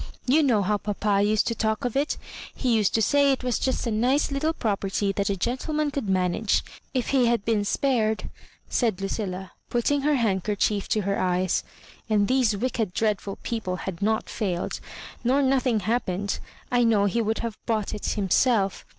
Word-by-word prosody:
You 280 +5 +4
know 235 -8 +3
how 205 +2 +1
papa 205 -1 0
used 215 +1 +2
to 230 - 0
talk 220 +1 -1
of 245 - -2
it. 285 +3 0 0.4
He 245 -3 +1
used 210 -3 +2
to 225 - +3
say 285 +3 +4
it 265 - -1
was 250 -2 0
just 260 - -1
a 230 - -1
nice 250 +7 +2
Httle 310 +3 -1
property 200 -2 0
that 200 0 -1
a 200 - 0
gen 240 +8 -1
tleman 300 +1 -2
could 255 -8 -2
manage. 185 +3 +1 0.3
If 255 -3 -1
he 260 -3 +3
had 235 -3 +1
been 220 -3 +1
spared," 220 -1 0 0.4
said 225 -7 0
Lucilla, 195 -1 -4 0.2
putting 275 +4 +1
her 295 +1 +2
handkerchief 205 -2 0
to 215 - +1
her 200 0 -1
eyes, 180 0 +1 0.5
"and 205 -2 +3
these 250 -5 +2
wicked 225 -4 -1
dreadful 205 -2 0
people 220 -6 -2
had 185 -3 -5
not 220 +2 +1
failed, 180 -5 -2 0.4
nor 265 +4 +3
nothing 260 -4 +2
happened, 200 -2 -1 0.3
I 245 -1 +3
know 220 -3 +3
he 215 +4 +1
would 220 0 0
have 225 -2 -5
bought 220 -3 0
it 210 - -6
himself. 200 0 +2
220 Hz, 185 wpm, -25 LUFS, 200-250 Hz, 0.5 s, You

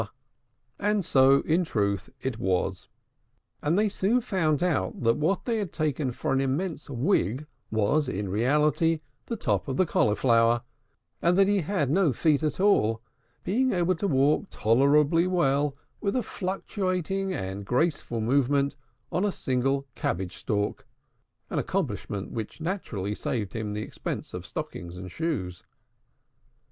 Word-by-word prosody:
And 205 -2 +1
so, 135 -1 +5
in 165 +3 +2
truth, 100 - -1
it 130 -4 -3
was: 95 -2 -1 0.7
and 155 +5 +1
they 215 +1 +3
soon 205 +4 +2
found 185 -10 +1
that 145 - 0 0.2
what 165 +6 0
they 230 -2 0
had 200 -5 -3
taken 150 -3 -1
for 120 - -2
an 135 - +2
immense 150 +7 -2
wig 130 - +1 0.2
was 110 +7 +1
in 100 -3 -3
reality 150 - +2 0.3
the 230 - -2
top 105 - -1
of 135 -1 -2
the 185 - +4
Cauliflower; 115 -2 +3 0.6
and 175 +2 +3
that 195 0 +5
he 200 -1 +2
had 150 -5 0
no 170 -4 +3
feet 150 +3 +2
at 155 0 -1
all, 115 - +3 0.4
being 255 +7 +1
able 180 0 +2
to 185 +3 -2
walk 145 +5 +2
tolerably 145 +8 +3
well 145 -5 +1 0.3
with 200 +1 0
a 250 - +1
fluctuating 190 0 -2
and 95 - -4
graceful 125 - 0
movement 140 +4 +2 0.4
on 180 - 0
a 205 - +2
single 135 -1 0
cabbage 90 0 -3
stalk, 105 -1 -2 0.6
an - - 0
accomplishment 105 - -3
which 110 +5 -5
naturally 140 - -3
saved 105 -2 -3
him 110 -2 -3
the 105 +1 -3
expense - - -5
of - - -6
stockings 85 0 -6
and 90 -1 -8
shoes. 100 - -3
145 Hz, 145 wpm, -27 LUFS, 115-180 Hz, 0.7 s, so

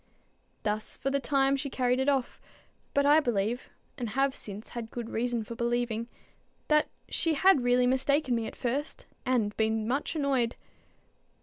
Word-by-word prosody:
Thus 215 0 -2
for 270 - -2
the 280 - +1
time 275 0 +2
she 280 +1 -3
carried 250 -1 +1
it 265 +2 +2
off; 270 -3 -1 0.5
but 280 0 +4
I 295 +2 +7
believe, 240 -2 -1 0.3
and 240 -3 -2
have 270 +3 +1
since 205 +1 -7
had 235 -2 -6
good 235 -1 -6
reason 235 0 -1
for 225 - -7
believing, 235 -1 -1 0.6
that 300 0 +4 0.2
she 325 -2 +1
had 370 -2 +5
really 245 0 +4
mistaken 265 +2 +2
me 230 -2 0
at - - -8
first, 270 +5 -3 0.2
and 225 -5 +1
been 220 0 +1
much 275 +6 -1
annoyed. 270 -6 +1
245 Hz, 165 wpm, -29 LUFS, 230-275 Hz, 0.6 s, I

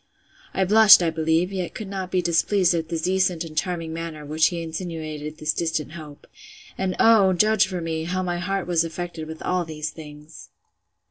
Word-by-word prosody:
I 190 - +2
blushed, 215 -1 +8
I 165 - +1
believe; 160 +3 0
yet 185 -3 -4
could 215 - -6
not 190 -2 -5
be 185 -1 0
displeased 175 +2 +2
at 165 -1 -2
the 170 - -2
decent 180 0 0
and 160 -2 -10
charming 165 -1 -2
manner 165 -2 -6
with 145 - -10
which 155 0 +4
he 170 -1 -4
insinuated 160 -2 -6
this 155 -1 -1
distant 160 -3 -2
hope: 155 -3 -11 0.5
And 185 -1 -2
oh! 210 -4 +5
judge 215 +2 +3
for 185 -2 -4
me, 160 -1 -3
how 185 +2 -2
my 175 -1 -2
heart 195 +2 -2
was 170 -2 +1
affected 165 -1 -6
with 160 0 -8
all 180 -1 0
these 155 -2 -5
things! 150 0 -12
170 Hz, 195 wpm, -23 LUFS, 160-185 Hz, 0.5 s, blushed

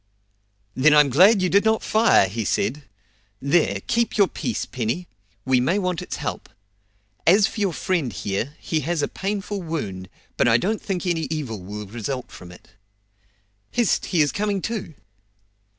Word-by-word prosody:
"Then 150 +5 +4
I'm 145 -2 +5
glad 190 - +6
you 185 - +2
did 200 +2 +4
not 220 0 +2
fire!" 220 - +4
he 110 +4 -3
said. 135 - -1 0.5
"There, 140 - +1
keep 235 -1 0
your 200 -2 +5
piece, 235 - -3
Penny; 130 +9 -3 0.4
we 130 -1 +3
may 170 +10 +1
want 180 -4 -1
its - - -5
help. - - -5 0.8
As 195 +4 +6
for 205 -1 -1
our - - -3
friend 165 -7 -1
here, 105 +10 -3
he 160 - -1
has 155 +1 -1
a - - +1
painful 200 0 -4
wound, 100 - -5 0.3
but - - +3
I 115 -1 +5
don't 210 - -1
think 190 -2 -3
any 165 -3 0
evil 135 - -4
will 105 +3 -7
result 120 +5 -5
from 90 -1 -11
it. 90 - -16 1.0
Hist, 240 -4 +1
he 170 - +2
is 145 - 0
coming 205 -1 -1
to!" 215 -9 -4
160 Hz, 165 wpm, -23 LUFS, 120-195 Hz, 1.0 s, glad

